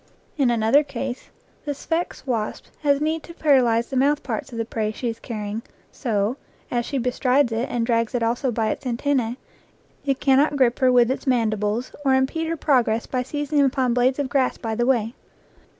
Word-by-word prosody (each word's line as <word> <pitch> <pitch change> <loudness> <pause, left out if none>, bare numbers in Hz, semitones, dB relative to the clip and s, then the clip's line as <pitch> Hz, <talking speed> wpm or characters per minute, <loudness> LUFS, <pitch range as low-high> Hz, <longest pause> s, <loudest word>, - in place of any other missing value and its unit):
In 275 -5 +2
another 235 +4 +4
case 265 -3 -5 0.3
the 290 -1 -3
Sphex 330 +3 -3
wasp 230 -5 -2 0.2
has 285 -2 +3
need 315 +2 -1
to 335 - -12
para 285 -5 +4
lyze 235 -1 +1
the 270 - -4
mouth 285 +3 +2
parts 290 -3 -4
of 235 - -7
the 230 - -1
prey 220 -2 -2
she 235 +2 -3
is 225 0 -6
carrying, 215 -2 -5 0.3
so, 220 -1 -1 0.3
as 240 -1 -1
she 280 - -2
bestrides 250 +1 +2
it 225 +3 -1
and 235 -1 -1
drags 230 0 0
it 240 - 0
also 240 +4 0
by 220 -1 0
its 275 - -5
antennae, 245 -1 0 0.7
it 275 -2 0
cannot 280 +2 +3
grip 250 -3 +2
her 255 -1 +4
with 245 0 +4
its 265 - -4
mandibles 220 -1 0
or 265 -2 +4
impede 270 +5 0
her 330 0 -2
progress 240 -6 +2
by 255 - -2
seizing 290 +3 -1
upon 260 -2 +2
blades 250 +2 +2
of 285 -2 -1
grass 265 -1 +1
by 225 -2 -4
the 240 +2 0
way. 235 -3 +1
250 Hz, 200 wpm, -23 LUFS, 230-280 Hz, 0.7 s, another